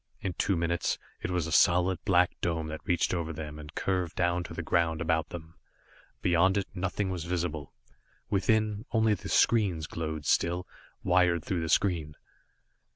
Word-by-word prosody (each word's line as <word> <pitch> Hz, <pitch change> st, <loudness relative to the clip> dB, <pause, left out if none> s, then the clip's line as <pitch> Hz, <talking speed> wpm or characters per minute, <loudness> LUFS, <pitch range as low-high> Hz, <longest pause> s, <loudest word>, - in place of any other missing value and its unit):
In 95 Hz, -, -3 dB
two 95 Hz, +2 st, 0 dB
minutes 85 Hz, +1 st, 0 dB, 0.2 s
it -, -, -3 dB
was 90 Hz, -3 st, 0 dB
a 80 Hz, -, -5 dB
solid, 90 Hz, +2 st, +3 dB
black 90 Hz, -1 st, +4 dB
dome 80 Hz, -2 st, -1 dB
that 80 Hz, 0 st, -6 dB
reached 90 Hz, 0 st, +1 dB
over 85 Hz, -2 st, -2 dB
them 75 Hz, -1 st, -7 dB
and 75 Hz, 0 st, -11 dB
curved 90 Hz, -3 st, -1 dB
down 85 Hz, 0 st, +1 dB
to -, -, -8 dB
the -, -, -4 dB
ground 80 Hz, -1 st, +1 dB
about 80 Hz, 0 st, 0 dB
them. 80 Hz, -1 st, -9 dB, 0.7 s
Beyond 90 Hz, +3 st, +3 dB
it, 100 Hz, -, 0 dB
nothing 95 Hz, +1 st, -2 dB
was 85 Hz, -3 st, -4 dB
visible. 85 Hz, -5 st, -3 dB, 0.6 s
Within, 105 Hz, +1 st, +1 dB
only 110 Hz, -2 st, +3 dB
the 100 Hz, -, -5 dB
screens 95 Hz, -9 st, +3 dB
glowed 80 Hz, -1 st, -5 dB
still, 85 Hz, +1 st, +1 dB, 0.4 s
wired 90 Hz, -2 st, +3 dB
through 90 Hz, -3 st, -1 dB
the 80 Hz, -, -3 dB
screen. 80 Hz, -7 st, +1 dB
85 Hz, 165 wpm, -29 LUFS, 80-95 Hz, 0.7 s, black